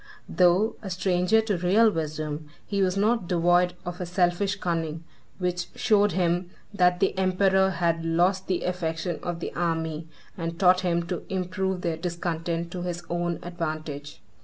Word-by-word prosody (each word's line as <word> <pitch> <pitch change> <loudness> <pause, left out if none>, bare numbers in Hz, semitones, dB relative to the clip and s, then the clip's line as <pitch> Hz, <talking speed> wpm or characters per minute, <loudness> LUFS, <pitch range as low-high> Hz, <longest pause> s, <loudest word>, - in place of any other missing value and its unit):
Though 185 +4 +3
a 195 - -6
stranger 180 +3 +2
to 210 -4 -1
real 210 +6 +4
wisdom, 155 -2 -4 0.2
he 200 -1 -1
was 185 0 +1
not 215 -1 +2
devoid 175 +1 +3
of 175 +1 -5
a 180 - -3
selfish 180 +2 +1
cunning, 165 -4 -2 0.3
which 180 -2 -2
showed 205 -1 +3
him 175 0 +1 0.2
that 180 -2 +3
the 195 - +2
emperor 190 0 +3
had 170 -2 0
lost 180 +4 +1
the 185 -2 0
affection 170 -1 -2
of 175 -1 -4
the - - -4
army, 160 -2 -2 0.3
and 165 -1 -4
taught 180 -1 +5
him 170 -2 +1
to 175 0 -4
improve 190 0 -2
their 165 -2 -1
discontent 170 0 -3
to 180 - -5
his 175 -1 -4
own 175 0 -1
advantage. 155 -4 -5
175 Hz, 160 wpm, -26 LUFS, 170-185 Hz, 0.3 s, taught